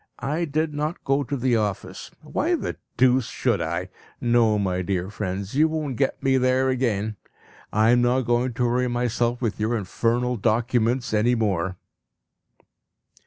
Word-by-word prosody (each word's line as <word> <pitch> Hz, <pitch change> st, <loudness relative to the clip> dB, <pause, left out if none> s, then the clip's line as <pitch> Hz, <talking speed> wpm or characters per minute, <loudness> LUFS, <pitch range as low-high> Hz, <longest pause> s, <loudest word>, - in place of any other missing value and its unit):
I 155 Hz, +5 st, 0 dB
did 155 Hz, +1 st, -1 dB
not 150 Hz, +3 st, -3 dB
go 135 Hz, +1 st, +1 dB
to 140 Hz, +1 st, -3 dB
the 125 Hz, -1 st, +1 dB
office. 105 Hz, -3 st, -3 dB
Why -, -, 0 dB
the -, -, -4 dB, 0.2 s
deuce 130 Hz, 0 st, +4 dB
should -, -, 0 dB
I? -, -, -3 dB, 0.3 s
No, 120 Hz, -3 st, +3 dB
my 95 Hz, -3 st, 0 dB
dear 95 Hz, +1 st, -2 dB
friends, 100 Hz, -1 st, -4 dB
you 150 Hz, +4 st, +4 dB
won't 155 Hz, -4 st, -3 dB
get 135 Hz, +2 st, -1 dB
me 135 Hz, -1 st, +3 dB
there 130 Hz, +1 st, +2 dB
again! 110 Hz, -5 st, -1 dB, 0.5 s
I 110 Hz, +2 st, +4 dB
am 120 Hz, 0 st, +4 dB
not 125 Hz, +2 st, +2 dB
going 120 Hz, +1 st, 0 dB
to 125 Hz, -, +1 dB
worry 125 Hz, +1 st, +1 dB
myself 120 Hz, 0 st, -1 dB
with 110 Hz, -3 st, -1 dB
your 110 Hz, +2 st, 0 dB
infernal 120 Hz, +5 st, 0 dB
documents 120 Hz, +2 st, +1 dB
any 115 Hz, +3 st, +3 dB
more. 95 Hz, -5 st, -1 dB
120 Hz, 160 wpm, -24 LUFS, 110-130 Hz, 0.5 s, deuce